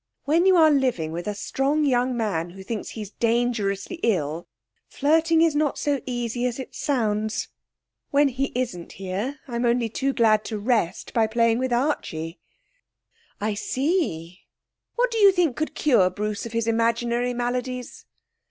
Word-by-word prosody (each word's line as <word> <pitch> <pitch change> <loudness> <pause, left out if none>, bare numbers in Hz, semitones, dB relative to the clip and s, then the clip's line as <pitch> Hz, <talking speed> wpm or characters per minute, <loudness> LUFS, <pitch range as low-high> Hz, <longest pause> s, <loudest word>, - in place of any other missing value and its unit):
When 330 +6 +3
you 380 - +6
are 320 -3 +6
living 250 - +1
with 170 +3 -5
a 210 - -2
strong 275 +8 0
young 250 -2 +1
man 190 -7 -1
who 190 +2 -11
thinks 215 +2 -4
he's 210 -3 -7
dangerously 230 - 0
ill, 165 -6 0 0.4
flirting 320 +3 +3
is 325 -3 +2
not 295 -1 +1
so 285 -2 0
easy 240 0 -1
as 245 - -4
it 265 - -7
sounds. 220 -6 -1 0.6
When 285 0 +4
he 270 +2 -2
isn't 230 -9 -3
here 195 +9 -4
I'm 235 -1 -2
only 235 -1 +2
too 275 +5 -1
glad 215 -4 +3
to 220 - -3
rest 210 -5 -1
by 225 -2 +3
playing 230 +1 +2
with 260 0 -1
Archie.' 195 - -1 1.0
'I 210 +1 -1
see. 205 - -1 0.6
What - - +1
do 455 - -1
you 400 -2 +8
think 350 -8 +1
could 310 - -3
cure 235 -11 +4
Bruce 210 +3 -3
of - - -10
his 230 -1 -1
imaginary 235 +2 +1
maladies?' 250 +1 -3
240 Hz, 160 wpm, -24 LUFS, 210-275 Hz, 1.0 s, you